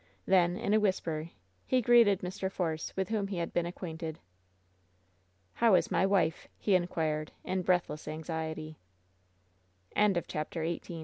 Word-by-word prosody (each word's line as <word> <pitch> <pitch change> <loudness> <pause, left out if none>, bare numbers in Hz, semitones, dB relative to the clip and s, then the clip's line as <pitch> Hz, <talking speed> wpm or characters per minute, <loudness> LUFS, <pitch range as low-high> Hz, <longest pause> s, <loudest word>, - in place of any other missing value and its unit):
Then, 180 -1 +3
in 205 - 0
a 215 - +5
whisper, 165 -6 -1 0.4
he 255 - +3
greeted 235 -5 +5
Mr. 190 +1 -3
Force, 160 -4 -2
with 190 -1 -1
whom 210 -3 0
he 195 -2 -4
had 170 -1 -3
been 175 0 +1
acquainted. 160 -3 -6 1.4
"How 230 -4 +4
is - - +2
my 190 - +3
wife?" 185 -4 +1
he 205 - +1
inquired, 160 -4 0
in 185 0 -1
breathless 175 -5 0
anxiety. 160 0 -4 1.2
CHAPTEE 175 -5 0 0.2
X - - -10
175 Hz, 135 wpm, -31 LUFS, 160-195 Hz, 1.4 s, a